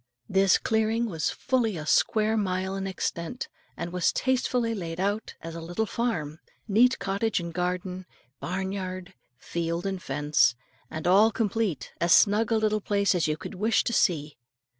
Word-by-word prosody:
This 195 0 +4
clearing 220 +1 +1
was 165 -8 -1
fully 230 -7 0
a 150 - -6
square 215 +6 +2
mile 190 -2 -1
in 195 0 -3
extent, 185 +4 -3 0.3
and 175 - -5
was 180 -2 +2
tastefully 250 -2 0
laid 170 -5 -5
out 200 +3 -1
as 165 0 -7
a 165 - -6
little 175 +7 -2
farm, 165 -10 -2 0.3
neat 240 +5 +4
cottage 200 +3 -1
and 170 -1 -6
garden, 180 +1 -3 0.3
barnyard, 185 0 -4 0.2
field, 170 +4 -3
and 190 -2 -2
fence, 145 -4 +2 0.3
and 160 +1 -6
all 200 +5 +6
complete, 210 - -2
as 170 +1 +6
snug 210 +2 +4
a 225 - +4
little 215 -1 +1
place 200 0 +2
as 175 -3 +1
you 155 0 -1
could - - -8
wish 215 +4 +2
to 235 - -2
see. 150 - +1
190 Hz, 160 wpm, -27 LUFS, 170-220 Hz, 0.3 s, all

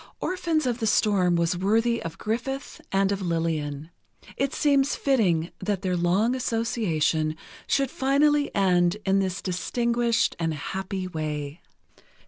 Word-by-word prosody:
"Orphans 335 -5 -1
of 245 -1 -1
the 220 - 0
Storm" 195 -5 +3
was 170 +1 +1
worthy 225 +6 +1
of 165 -1 -6
Griffith 245 +5 -4
and 195 0 +2
of 200 0 -2
Lillian. 160 -3 -2 0.4
It 275 +1 0
seems 280 -1 +2
fitting 180 - +1
that 195 0 -2
their 185 -1 0
long 185 +7 +2
association 190 -11 0 0.3
should 275 -2 +1
finally 285 +2 +2
end 180 -2 +3
in 195 0 +3
this 190 0 -2
distinguished 235 +6 0
and 165 -2 -1
happy 190 +4 -4
way. 150 -2 -4
195 Hz, 130 wpm, -25 LUFS, 170-240 Hz, 0.4 s, Storm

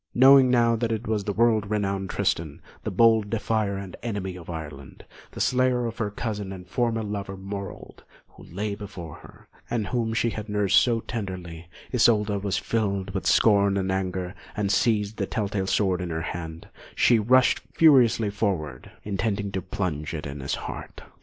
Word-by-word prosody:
Knowing 130 +1 +7
now 120 -2 +4
that 115 0 -1
it 110 +1 -2
was 105 -3 -1
the 105 - -1
world 110 -1 +2
renowned 100 -2 -1
Tristan, 80 -4 -1 0.2
the - - -2
bold 110 +1 +4
defier 110 -2 -1
and 95 -2 -7
enemy 100 -5 -4
of 90 -2 -11
Ireland, 75 -5 -8 0.3
the - - -8
slayer 125 -1 +2
of 115 0 -5
her 110 -3 0
cousin 105 -2 -4
and 90 -2 -9
former 115 +3 0
lover, 100 -2 -5
Morold, 100 0 -7 0.3
who - - -18
lay 100 +3 -4
before 95 -6 -8
her, - - -16 0.2
and 115 -3 -1
whom 115 -2 -1
she 115 0 +1
had 110 0 -6
nursed 105 -2 +4
so 115 -2 +1
tenderly, 90 -7 -6 0.2
Isolda 105 -4 +3
was 100 -1 -1
filled 100 -3 -1
with 95 - -2
scorn 100 -2 +4
and 95 -1 -1
anger; 95 -1 -2 0.2
and 100 -1 0
seizing 105 0 +1
the 100 - -2
tell 105 -4 -1
tale 95 -2 -2
sword 95 -3 +1
in 90 - -4
her 80 0 -3
hand, 80 -2 -6 0.3
she 120 -2 +4
rushed 125 +4 +4
furiously 125 -8 +5
forward, 85 - -2
intending 100 0 -2
to 95 - -2
plunge 85 -7 -3
it 75 - -5
in 70 0 -6
his 70 0 -2
heart. - - -8
100 Hz, 180 wpm, -25 LUFS, 95-115 Hz, 0.3 s, Knowing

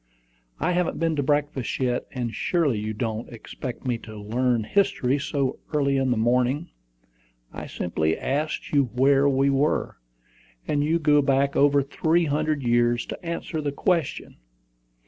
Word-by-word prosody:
"I - - +1
haven't 180 -1 0
been 165 -1 +1
to - - +2
breakfast 145 -4 -1
yet; 125 -2 -1
and 120 -4 -3
surely 145 - 0
you 110 +1 -3
don't 110 +1 -4
expect 120 +2 -8
me 120 -2 -1
to 110 -1 -10
learn 120 +3 0
history 145 - +1
so 140 -1 -2 0.2
early 140 -2 +2
in 135 -1 +1
the 120 - +1
morning. 125 +7 +1 0.8
I - - -7
simply 80 -2 -1
asked 150 +3 -2
you 140 -2 +3
where 140 +2 +4
we 135 0 +2
were, 140 +3 0 0.7
and 145 -1 +1
you 160 +3 +2
go 150 -2 +4
back 140 0 +1
over 145 0 +4
three 165 +5 +1
hundred 150 -1 0
years 120 0 +2
to - - -8
answer 170 -1 -4
the 145 -1 -2
question." 165 0 -1
140 Hz, 155 wpm, -25 LUFS, 120-150 Hz, 0.8 s, where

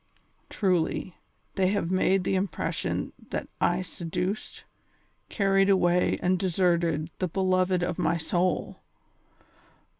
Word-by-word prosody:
Truly, 180 -2 0 0.4
they 190 -1 +2
have 195 -3 0
made 185 0 +2
the 195 - 0
impression 190 +1 -2 0.2
that - - -3 0.2
I 175 +1 -1
seduced, 180 +3 -4 0.7
carried 195 -1 +2
away 180 -2 +3
and 185 0 +2
deserted 170 -4 +1
the 185 - 0
beloved 185 0 +1
of 175 - -2
my 165 +2 +1
soul. 175 +3 -1
185 Hz, 110 wpm, -27 LUFS, 175-190 Hz, 0.7 s, away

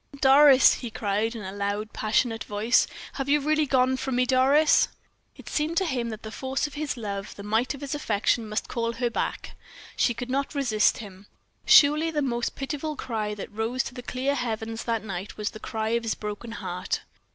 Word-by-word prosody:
"Doris!" 275 0 +7
he 240 - -5
cried, 215 +2 -1
in 220 - -6
a 190 - -5
loud, 205 +2 -3
passionate 225 +1 0
voice, 210 +4 +2 0.3
"have 270 0 -4
you 295 +1 +4
really 305 +1 +1
gone 260 -1 +3
from 265 -1 -3
me, 250 0 +3
Doris?" 270 +4 +4 0.5
It - - -15
seemed 310 +3 -1
to 385 - +3
him 245 -7 -2
that 220 -1 -7
the 220 - -7
force 265 +4 -2
of 295 - -6
his 295 -2 -3
love, 200 -3 -5
the 200 - -9
might 220 +6 0
of 280 - -12
his 280 -1 -4
affection, 225 -4 0
must 215 - -2
call 230 -1 -2
her 240 0 -1
back - - -3 0.4
she 240 - +2
could 245 +1 -5
not 280 +2 -1
resist 235 -7 +2
him. 200 -2 -11 0.4
Surely 305 +3 +6
the 300 -2 -1
most 240 -3 -2
pitiful 295 +2 -4
cry 215 -6 -3
that 205 - -8
rose 225 +4 -1
to - - -7
the 250 - -7
clear 255 +3 -1
heavens 225 -3 -3
that 230 -2 -1
night 195 -1 -6
was 210 0 -2
the 215 - -10
cry 220 0 -3
of 235 +1 +1
this 225 -1 -2
broken 210 +2 -6
heart. 180 -4 -3
235 Hz, 205 wpm, -26 LUFS, 215-270 Hz, 0.5 s, Doris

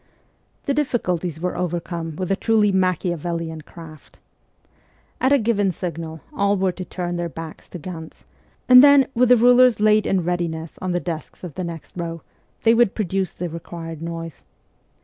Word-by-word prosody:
The 280 - +1
difficulties 180 - -1
were 180 +2 -2
overcome 170 -2 -3
with 185 +2 -3
a - - +3
truly 215 -1 +2
Machiavellian 170 -3 -1
craft. 155 -1 -13 1.0
At 260 - +2
a 285 - +6
given 210 -5 +1
signal 165 -2 -6
all 200 0 +1
were 190 0 +1
to 185 - -7
turn 175 -1 -4
their 170 0 -2
backs 165 0 -9
to - - -7
Ganz, 165 -1 -9 0.4
and 250 +1 +9
then, 285 -2 +7
with 245 0 +3
the 250 - +7
rulers 245 0 +5
laid 215 0 +4
in 185 -2 +1
readiness 170 -2 -3
on 185 - -2
the 175 - 0
desks 165 -1 -6
of 175 -4 -7
the 185 - -4
next 170 -2 -8
row, 165 -2 -5 0.4
they 225 - +5
would 235 -3 +3
pro 215 - -1
duce 190 0 -1
the 175 - -4
required 165 -1 -8
noise. 165 -1 -6
180 Hz, 170 wpm, -22 LUFS, 165-210 Hz, 1.0 s, and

